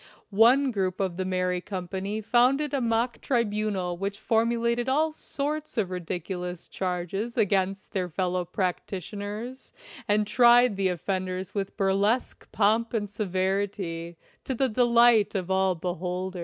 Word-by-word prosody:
One 250 Hz, +6 st, +5 dB
group 190 Hz, -4 st, -1 dB
of 185 Hz, -3 st, -1 dB
the 185 Hz, -, -2 dB
merry 180 Hz, -1 st, 0 dB
company 195 Hz, +3 st, -4 dB
founded 260 Hz, +7 st, +2 dB
a 275 Hz, -, +1 dB
mock 235 Hz, +1 st, 0 dB
tribunal 210 Hz, -7 st, -1 dB
which 200 Hz, +1 st, -3 dB
formulated 235 Hz, +2 st, +1 dB
all 310 Hz, +4 st, +2 dB
sorts 300 Hz, -1 st, -4 dB
of 195 Hz, -5 st, 0 dB
ridiculous 180 Hz, 0 st, -5 dB
charges 190 Hz, +5 st, -3 dB
against 195 Hz, -2 st, 0 dB
their 185 Hz, -2 st, -2 dB
fellow 180 Hz, +1 st, -1 dB
prac 180 Hz, +1 st, -2 dB
titioners 205 Hz, +6 st, -6 dB, 0.4 s
and 210 Hz, 0 st, +2 dB
tried 240 Hz, 0 st, +5 dB
the 195 Hz, -1 st, +1 dB
offenders 185 Hz, +1 st, -3 dB
with 195 Hz, -2 st, -4 dB
burlesque 200 Hz, +5 st, 0 dB
pomp 225 Hz, +3 st, +2 dB
and 210 Hz, -2 st, -1 dB
severity, 190 Hz, -4 st, -2 dB, 0.3 s
to 265 Hz, -, -3 dB
the 265 Hz, +2 st, +1 dB
delight 235 Hz, -2 st, +4 dB
of 190 Hz, -1 st, -2 dB
all 190 Hz, -1 st, +2 dB
beholders. 180 Hz, +2 st, -4 dB
200 Hz, 135 wpm, -27 LUFS, 185-235 Hz, 0.4 s, One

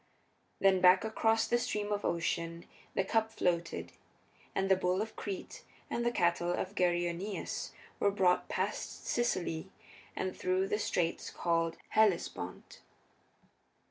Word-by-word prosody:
Then 190 Hz, -1 st, +4 dB
back 185 Hz, +1 st, +7 dB
across 225 Hz, 0 st, +2 dB
the 240 Hz, -, +2 dB
Stream 210 Hz, -4 st, -2 dB
of 205 Hz, 0 st, -1 dB
Ocean 170 Hz, 0 st, -1 dB, 0.3 s
the 195 Hz, -, +2 dB
cup 225 Hz, +3 st, +1 dB
floated, 170 Hz, -5 st, -1 dB, 0.6 s
and 195 Hz, -, +1 dB
the 190 Hz, -, +5 dB
bull 185 Hz, 0 st, +1 dB
of 220 Hz, +1 st, -3 dB
Crete 200 Hz, -3 st, -6 dB, 0.3 s
and 235 Hz, -, 0 dB
the 240 Hz, -, +3 dB
cattle 175 Hz, -5 st, +1 dB
of 185 Hz, +2 st, -2 dB
Geryoneus 175 Hz, +1 st, -1 dB, 0.3 s
were 200 Hz, -, +4 dB
brought 185 Hz, -3 st, +2 dB
past -, -, -3 dB
Sicily 185 Hz, -7 st, -1 dB, 0.5 s
and 185 Hz, -1 st, -2 dB
through 185 Hz, +1 st, +1 dB
the 210 Hz, -, 0 dB
straits 170 Hz, -5 st, -1 dB
called 165 Hz, -1 st, 0 dB
the -, -, -27 dB
Hellespont. 215 Hz, -5 st, 0 dB
190 Hz, 135 wpm, -33 LUFS, 175-210 Hz, 0.6 s, back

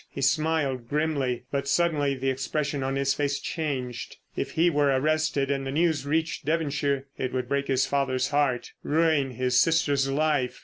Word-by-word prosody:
He -, -, -7 dB
smiled 145 Hz, -6 st, +1 dB
grimly. 145 Hz, -5 st, 0 dB
But 140 Hz, 0 st, -2 dB
suddenly 145 Hz, -3 st, +2 dB
the 135 Hz, +1 st, 0 dB
expression 140 Hz, +2 st, -2 dB
on 135 Hz, +1 st, -1 dB
his 140 Hz, 0 st, +1 dB
face 140 Hz, -1 st, -1 dB
changed. 130 Hz, -8 st, -4 dB, 0.2 s
If -, -, -3 dB
he 165 Hz, +2 st, +3 dB
were 145 Hz, -4 st, +2 dB
arrested 145 Hz, 0 st, +1 dB
and 135 Hz, -1 st, -1 dB
the -, -, -2 dB
news 160 Hz, -1 st, +1 dB
reached 160 Hz, +2 st, -1 dB
Devonshire 145 Hz, -3 st, 0 dB
it 130 Hz, -1 st, -2 dB
would 125 Hz, -1 st, -2 dB
break 140 Hz, +1 st, -1 dB
his 130 Hz, -1 st, +2 dB
father's 130 Hz, -2 st, 0 dB
heart, 140 Hz, -4 st, 0 dB
ruin 155 Hz, -4 st, +1 dB
his 125 Hz, +1 st, +2 dB
sister's 145 Hz, -3 st, +2 dB
life. 145 Hz, -3 st, 0 dB
140 Hz, 170 wpm, -26 LUFS, 135-155 Hz, 0.2 s, he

